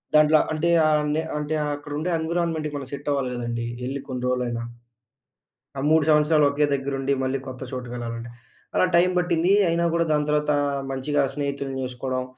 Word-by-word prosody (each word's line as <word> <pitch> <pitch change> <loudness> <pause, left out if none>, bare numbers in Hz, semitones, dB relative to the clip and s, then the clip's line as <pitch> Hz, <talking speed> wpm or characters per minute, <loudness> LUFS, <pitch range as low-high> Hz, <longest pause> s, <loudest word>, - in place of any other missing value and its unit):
దాంట్లో 155 0 +6
అంటే 155 +2 0 0.2
ఆహ్, 155 -1 +4
అండి 150 +1 0 0.2
అంటే 150 +1 -2 0.2
అక్కడ 145 0 -10
ఉండే 160 +4 -2
ఎన్విరాన్మెంట్‌కి 160 -2 -1
మనం 135 -2 -7
సెట్ 140 +1 -4
అవ్వాలి 135 -3 0
గదండీ. 120 -1 -3 0.2
యెళ్లి 135 +2 -3
కొన్ని 125 -1 -4
రోజులైనా. 125 -2 -1 1.2
ఆ - - -2
3 160 0 +5
సంవత్సరాలు 150 -1 +4
ఒకే 145 +1 +2
దగ్గరుండి, 135 0 -1
మళ్ళీ 130 +1 -1
కొత్త 130 0 -8
చోటుకి 125 -2 -5
వెళ్లాలంటే, 115 0 -5 0.4
అలా - - +4
టైమ్ 180 +1 +4
పట్టింది. 175 0 +1 0.2
అయినా 170 +1 +1
గూడా 170 0 +2
దాని 150 0 +1
తర్వాత 150 0 +2 0.4
మంచిగా 140 +2 0
స్నేహితుల్ని 140 -1 -3
జేసుకోవడం. 130 0 -3
145 Hz, 165 wpm, -24 LUFS, 130-155 Hz, 1.2 s, దాంట్లో